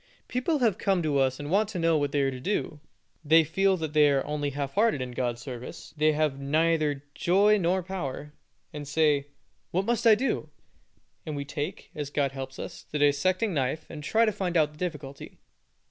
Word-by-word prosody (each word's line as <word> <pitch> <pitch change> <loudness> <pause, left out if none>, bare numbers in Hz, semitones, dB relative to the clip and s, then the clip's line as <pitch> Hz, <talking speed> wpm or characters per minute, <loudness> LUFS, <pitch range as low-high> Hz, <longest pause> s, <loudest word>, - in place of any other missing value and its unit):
People 255 +6 0 0.2
come 190 -4 +1
to 145 -3 +1
us 130 0 +1
and 145 +1 -5
want 205 +2 +2
to 210 - -5
know 165 -1 +2
what 145 -2 0
they 145 - +1
are 135 - +1
to 130 - -7
do; 155 0 -2 0.4
they 160 +2 +6
feel 190 +5 +2
that 160 -3 -4
they 150 -1 +5
are 140 -1 +1
only 150 -1 -2
half 140 0 -4
hearted 215 -7 +2
in 125 -1 -4
God's 120 -1 -2
service; 125 -2 -8
they 155 0 +3
have 150 -3 0
neither 150 0 +1
joy 205 +6 +3
nor 185 +1 +1
power, 150 -5 -5 0.4
and 145 -1 -6
say, 145 -2 +2 0.4
"What 190 +3 0
must 235 +1 +1
I 220 - +8
do?" 260 +5 -2 0.7
and 155 -2 -5
we 140 0 -4
take, 150 +5 -5
as 145 -2 -4
God 140 -2 0
helps 135 -1 -7
us, - - -7
the 150 - -3
dissecting 185 +8 +2
knife, 140 +2 -1
and 150 -2 -8
try 225 +9 +3
to 215 - +2
find 180 -4 -1
out 150 -2 +3
the 150 - -18
difficulty. 150 -6 -6
150 Hz, 200 wpm, -27 LUFS, 140-185 Hz, 0.7 s, I